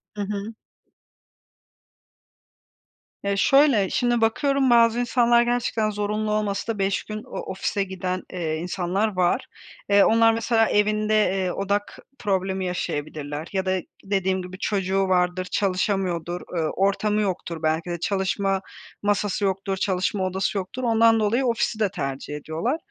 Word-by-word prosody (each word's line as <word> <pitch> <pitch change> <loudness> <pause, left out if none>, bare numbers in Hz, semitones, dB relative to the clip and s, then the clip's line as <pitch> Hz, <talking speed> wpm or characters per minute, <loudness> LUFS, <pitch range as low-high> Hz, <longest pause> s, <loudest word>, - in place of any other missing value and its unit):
Hı 205 - -4
hı. 205 +2 -4 2.7
Ya 200 0 0
şöyle, 270 -7 +4
şimdi 240 -1 +1
bakıyorum 270 +4 +2
bazı 235 0 +5
insanlar 240 -1 +3
gerçekten 240 -2 0
zorunlu 210 +1 -2
olmasa 210 +1 -1
da 205 - -10
5 195 0 0
gün 215 0 -6
o - - -7
ofise 195 +1 -1
giden, 185 -1 -4
eee, 165 -3 -2
insanlar 185 +4 -1
var. 180 -1 +1 0.4
Eee, 200 0 +6
onlar 225 0 +5
mesela 225 0 +2
evinde, 215 +1 +2
eee, 190 -3 +2
odak 200 +2 -2 0.2
problemi 190 -3 -1
yaşayabilirler 150 -3 -4
ya 190 -1 0
da 185 0 +1 0.2
dediğim 190 -1 0
gibi 180 0 -8
çocuğu 195 -1 0
vardır, 180 0 +1
çalışamıyordur, 185 -3 -1
eee, 165 - +1
ortamı 205 +2 +1
yoktur 175 -4 -3
belki 160 +2 0
de 175 -1 -3
çalışma 195 0 0 0.4
masası 205 0 0
yoktur, 195 0 -1
çalışma 190 0 0
odası 190 +2 -1
yoktur, 195 +7 -4
ondan 225 -1 +4
dolayı 225 +5 +1
ofisi 230 -2 0
de 210 -2 +2
tercih 140 -4 -4
ediyorlar. 155 - -2
195 Hz, 135 wpm, -24 LUFS, 185-215 Hz, 2.7 s, Eee